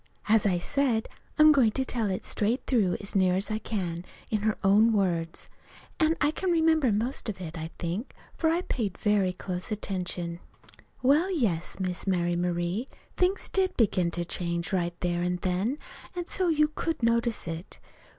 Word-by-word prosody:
As 215 -1 +4
I 180 -3 +2
said, 240 +3 0 0.3
I'm 305 0 +8
going 265 -6 +5
to 265 - 0
tell 230 -5 -1
it 185 - -3
straight 230 +5 0
through 210 -9 +2
as 200 - -6
near 185 -2 +4
as 195 +3 0
I 215 - -1
can 180 -6 -3 0.3
in 215 - +2
her 215 0 0
own 210 +4 +5
words. 170 -5 -1 0.5
And 320 0 +3
I 295 0 +3
can 370 +4 -2
remember 320 -6 +3
most 230 +3 0
of 195 - -5
it, 170 -2 -6
I 160 0 -5
think, 180 +9 -4 0.2
for 320 - +1
I 335 +2 +1
paid 210 - -2
very 205 -3 +2
close 180 +1 -6
attention. 180 -4 -3 0.6
"Well, 295 +8 +4
yes, 205 - -1
Miss 185 0 -2
Mary 175 -2 +1
Marie, 175 +6 -1 0.3
things 370 +2 +1
did 380 -1 +1
begin 190 -6 +2
to 175 - -1
change 170 +1 -2
right 175 -2 -1
there 175 -1 0
an' 180 0 0
then, 190 +9 0 0.4
an' 350 -1 -3
so 370 +1 0
you 305 -2 +3
could 315 -2 -3
notice 230 -3 +1
it. 165 +2 -6
205 Hz, 180 wpm, -28 LUFS, 180-265 Hz, 0.6 s, I'm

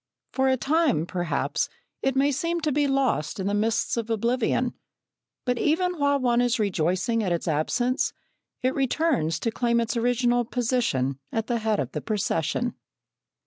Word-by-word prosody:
For 265 0 +1
a 260 0 +3
time, 285 - +2
perhaps, 175 -1 -1 0.3
it 270 -1 0
may 280 +2 +3
seem 335 +5 -1
to 305 -1 0
be 290 +1 +2
lost 270 - 0
in 190 - -2
the 200 - 0
mists 220 +3 +1
of 230 -1 -2
oblivion, 240 +2 +1 0.7
but 250 -2 0
even 355 +2 +1
while 285 0 +3
one 245 -2 +2
is 245 0 +2
rejoicing 185 +2 0
at 185 - -1
its 170 0 -1
absence 240 - +1 0.5
it 255 +1 +2
returns 265 - +1
to 230 - 0
claim 235 +1 +1
its 230 +1 -1
original 240 +1 +2
position 230 - 0
at 225 -1 -1
the 235 -1 -1
head 220 -1 0
of - - -2
the - - -4
procession. 210 +1 -1
240 Hz, 165 wpm, -25 LUFS, 210-265 Hz, 0.7 s, a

